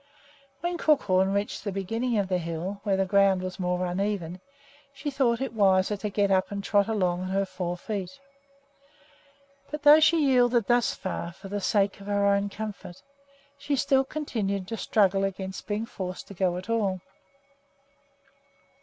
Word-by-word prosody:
When 345 0 -2
Crookhorn 195 - +3
reached 200 +1 -2
the 200 - -3
beginning 225 +5 -2
of 200 -2 +1
the 185 -1 0
hill, 170 +4 -5
where 200 -2 +1
the 195 - +1
ground 195 -1 +3
was 185 +1 -6
more 180 0 0
uneven, 180 -1 -2 0.5
she 290 +1 -4
thought 255 -4 +1
it 265 -2 -3
wiser 195 -1 +3
to 210 +1 -3
get 200 -1 +1
up 185 -1 +2
and 200 -1 -5
trot 200 0 +2
along 185 -5 0
on 185 - -4
her 195 +1 +1
four 175 -2 -4
feet; 205 +6 -5 1.5
but 300 0 -6
although 295 +1 +9
she 325 +2 +4
yielded 245 -3 +3
thus 240 +1 +2
far 175 -2 -5
for 195 +2 -11
the 205 +1 -3
sake 200 0 +1
of 200 - -11
her 200 0 +1
own 200 0 +2
comfort, 205 -4 -8 0.6
she 285 0 -1
still 270 0 +3
continued 210 -10 -3
to 225 - -3
struggle 195 -3 +2
against 190 0 -4
being 210 +2 -2
forced 185 -5 -6
to - - -8
go 180 -1 0
at 185 - -7
all. 205 -5 0
200 Hz, 170 wpm, -27 LUFS, 185-225 Hz, 1.5 s, although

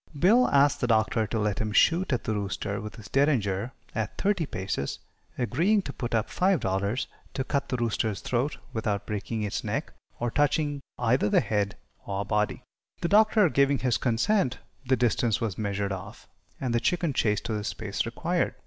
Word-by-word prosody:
Bill 220 - +5
asked 140 0 +4
the 125 - +1
Doctor 110 -1 +2
to 115 - -2
let 105 -2 0
him 110 -1 -1
shoot 165 - +3
at 125 - 0
the 110 - -1
rooster 100 -1 -3
with 105 - -7
his 110 -2 -11
derringer 120 -7 +1 0.2
at 110 -2 -3
thirty 195 -6 +1
paces, 95 - -3 0.4
agreeing 170 - +2
to - - -6
put 120 -2 -3
up 110 0 +1
$5 110 - +1 0.3
to 130 - 0
cut 140 +1 -1
the 125 - 0
rooster's 110 -3 -1
throat 130 +4 -1 0.2
without 105 -3 -1
breaking 105 +1 -3
its 105 - -2
neck - - -3 0.3
or 120 0 -1
touching 145 0 +1 0.2
either 120 -2 +2
the - - +5
head 100 -2 -1 0.3
or 100 0 -3
body. 105 +1 0 0.4
The 170 - 0
Doctor, 215 -1 +5
giving 140 -2 +3
his 125 -3 +1
consent, 130 - +1 0.3
the 130 - +4
distance 115 -1 +2
was 110 -4 -3
measured 100 -1 -1
off, 95 +2 -7 0.3
and 130 -3 -1
the 120 - +3
chicken 170 +1 0
chased 105 -4 +1
to 110 - -2
the 105 -1 -2
space 105 -1 -2
required. 170 +9 -1
115 Hz, 180 wpm, -27 LUFS, 105-140 Hz, 0.4 s, Bill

